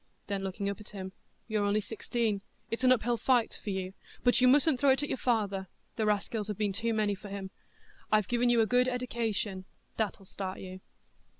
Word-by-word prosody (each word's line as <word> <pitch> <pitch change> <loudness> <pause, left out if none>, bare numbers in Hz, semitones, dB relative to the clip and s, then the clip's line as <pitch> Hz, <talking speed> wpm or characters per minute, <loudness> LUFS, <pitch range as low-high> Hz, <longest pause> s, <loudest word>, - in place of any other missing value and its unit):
Then 200 -1 -2
looking 195 +1 -3
up 200 -1 -2
at 210 - -11
him, 190 -2 -6 0.4
"You're 215 -2 0
only 205 +1 +2
sixteen; 220 -1 -1 0.3
it's 230 +3 -2
an 255 - +6
up 255 - +4
hill 240 +1 +1
fight 240 0 +2
for - - -4
you, 190 -1 -3 0.3
but 245 0 +4
you 255 - +7
mustn't 285 +1 +5
throw 285 - +4
it 270 +2 +4
at 290 - -2
your - - -1
father; 200 -6 0 0.3
the 220 -2 0
raskills 210 +1 0
have 210 -3 -3
been 205 -2 0
too 230 +3 -1
many 215 -2 +1
for 200 +1 -8
him. 195 -1 -5 0.6
I've 215 -3 +4
given 240 0 +2
you 235 -1 +5
a - - +4
good 250 +2 +3
eddication,—that'll 220 -5 -3
start 190 0 -5
you." 185 0 -8
215 Hz, 205 wpm, -31 LUFS, 200-240 Hz, 0.6 s, you